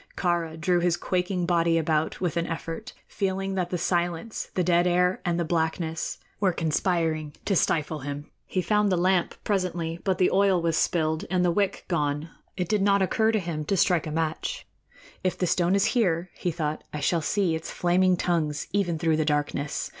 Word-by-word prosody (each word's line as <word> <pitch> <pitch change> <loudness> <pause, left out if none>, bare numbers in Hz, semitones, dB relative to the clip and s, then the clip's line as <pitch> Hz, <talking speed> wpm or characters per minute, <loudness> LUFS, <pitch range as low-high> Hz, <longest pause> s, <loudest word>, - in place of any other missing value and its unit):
Kāra 170 -3 -1
drew 175 +3 +2
his 175 0 +1
quaking 180 0 -1
body 170 -1 +2
about 155 -1 0
with 175 -3 -1
an 170 0 0
effort, 165 +7 -5
feeling 195 -1 -2
that 180 -2 -1
the 180 - -1
silence, 175 +4 -1
the 180 - +2
dead 175 0 +3
air 180 +1 +2
and 175 -1 0
the 170 - 0
blackness 160 0 -1 0.2
were 195 -2 +3
conspiring 160 -2 0
to 195 - +1
stifle 155 -2 +1
him. 145 +1 -5 0.2
He 185 - -1
found 210 0 +2
the 180 - +2
lamp 180 0 +2
presently, 175 -4 -1
but 190 -2 +1
the 180 - +3
oil 195 -1 +4
was 165 -1 0
spilled 160 -2 +1
and 180 0 +2
the 175 - +3
wick 200 +2 0
gone. 150 -1 -1 0.3
It 180 -2 -1
did 210 +1 +1
not 200 0 +4
occur 220 +4 +2
to 220 - +1
him 165 -4 -3
to 195 - 0
strike 175 -3 +2
a - - -4
match. 160 - -2 0.6
"If 185 - 0
the 180 - 0
stone 175 +2 +2
is 200 +1 +3
here," 180 -7 +1
he 180 - -2
thought, 155 -2 -3
"I 150 - -4
shall 165 +3 +1
see 185 +1 +1
its 160 0 -4
flaming 180 +1 +2
tongues 155 -5 0
even 180 -4 0
through 160 -1 +1
the 155 - +2
darkness. 145 -1 -1
175 Hz, 195 wpm, -26 LUFS, 160-185 Hz, 0.6 s, oil